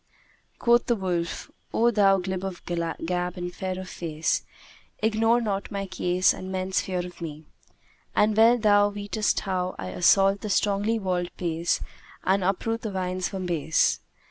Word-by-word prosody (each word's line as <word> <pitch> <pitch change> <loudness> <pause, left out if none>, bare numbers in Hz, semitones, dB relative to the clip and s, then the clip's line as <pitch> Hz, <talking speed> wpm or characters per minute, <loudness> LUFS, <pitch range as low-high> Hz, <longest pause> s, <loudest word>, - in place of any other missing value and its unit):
Quoth 240 0 +3
the 240 - +3
wolf, 175 -4 -3 0.2
"O 235 +1 +3
thou 200 -3 +4
glib 185 0 -3
of 190 -3 -6
gab 175 +1 -2
and 175 0 -4
fair 185 0 -4
of 185 - -7
face, 160 -3 -2 0.5
ignore 225 +2 +2
not 200 -4 -2
my 200 -2 -3
case 185 -1 +2
and 185 0 -7
men's 185 0 0
fear 180 -2 -3
of 175 -1 -11
me; 155 -1 -7 0.7
and 210 0 +3
well 230 +3 +6
thou 205 -2 +4
weetest 205 +1 -1
how 185 -2 -2
I 95 - -5
assault 195 - +4
the 210 - -4
strongly 205 +3 +1
walled 180 -4 -1
place 170 -1 0 0.4
and 190 +1 +2
uproot 225 +5 -1
the 220 - -3
vines 185 -1 -2
from 190 -2 -4
base. 160 -3 +1
190 Hz, 160 wpm, -26 LUFS, 180-205 Hz, 0.7 s, well